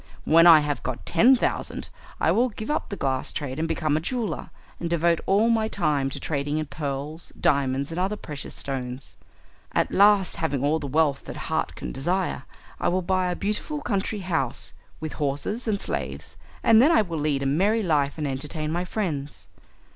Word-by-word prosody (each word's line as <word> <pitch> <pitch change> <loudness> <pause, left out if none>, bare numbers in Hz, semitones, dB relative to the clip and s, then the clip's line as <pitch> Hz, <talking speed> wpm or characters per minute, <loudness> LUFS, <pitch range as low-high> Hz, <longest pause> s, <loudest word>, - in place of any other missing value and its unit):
When 165 +2 +7
I 160 -3 +9
have 145 -3 -2
got 130 -1 -5
ten 240 +10 +5
thousand 245 - -2 0.3
I - - +3
will 250 +3 +3
give 220 +4 -5
up 305 - -1
the 200 - -4
glass 130 -6 -1
trade 140 -1 -4
and 165 - 0
become 155 -2 0
a - - +2
jeweller, 215 - -3 0.3
and 170 - -3
devote 170 0 +2
all 210 +4 +4
my 220 -1 +2
time 150 -9 0
to - - -6
trading 145 0 -2
in 155 - -1
pearls, 145 +2 -5
diamonds, 140 +1 +1
and 165 - -3
other 190 +3 0
precious 150 -8 -8
stones. 130 -1 -5 0.6
At - - +1
last, 200 -1 +4
having 145 -5 -1
all 150 +3 +2
the 145 - -5
wealth 145 0 +1
that - - -7
heart - - -2
can - - -6
desire, 180 +6 -1 0.3
I - - 0
will 185 +1 +1
buy 185 0 +1
a 180 - -1
beautiful 215 +9 -2
country 205 -3 -2
house, 160 -9 -2 0.3
with 155 -1 -5
horses 145 - -2
and 205 -2 +1
slaves, - - -4 0.3
and 225 0 +7
then 295 +6 +6
I 320 - +5
will 170 -5 -4
lead 145 -2 0
a - - -2
merry 200 +11 +2
life 145 -5 +1
and 150 -2 -2
entertain 150 +3 -3
my 175 +2 -1
friends. 155 -9 -4
160 Hz, 190 wpm, -25 LUFS, 140-195 Hz, 0.6 s, I